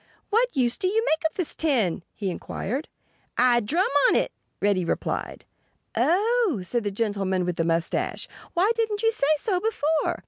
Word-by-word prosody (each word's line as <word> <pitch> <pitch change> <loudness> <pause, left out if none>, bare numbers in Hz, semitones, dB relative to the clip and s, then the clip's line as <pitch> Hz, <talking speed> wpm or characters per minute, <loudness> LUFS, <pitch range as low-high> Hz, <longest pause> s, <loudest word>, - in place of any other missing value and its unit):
"What 465 - +2
use 245 -2 +2
do 380 - 0
you 445 +4 +1
make 320 -5 +1
of - - -34
this 360 -5 -2
tin?" 235 - +1
he 195 -3 -2
inquired. 255 - -4 0.5
"I 245 -1 +5
drum 315 - +1 0.2
on - - +3
it," - - +1 0.3
Reddy 200 -3 +2
replied. 170 - -3 0.5
"Oh!" 415 - +2
said 235 +5 -1
the 205 - 0
gentleman 195 -3 -1
with 180 -1 -2
the 165 - +1
mustache. 165 0 -1 0.3
"Why 380 +6 +4
didn't 445 -2 -1
you 450 - +4
say 360 -11 0
so 370 +3 0
before?" 320 -7 0
285 Hz, 170 wpm, -25 LUFS, -, 0.5 s, I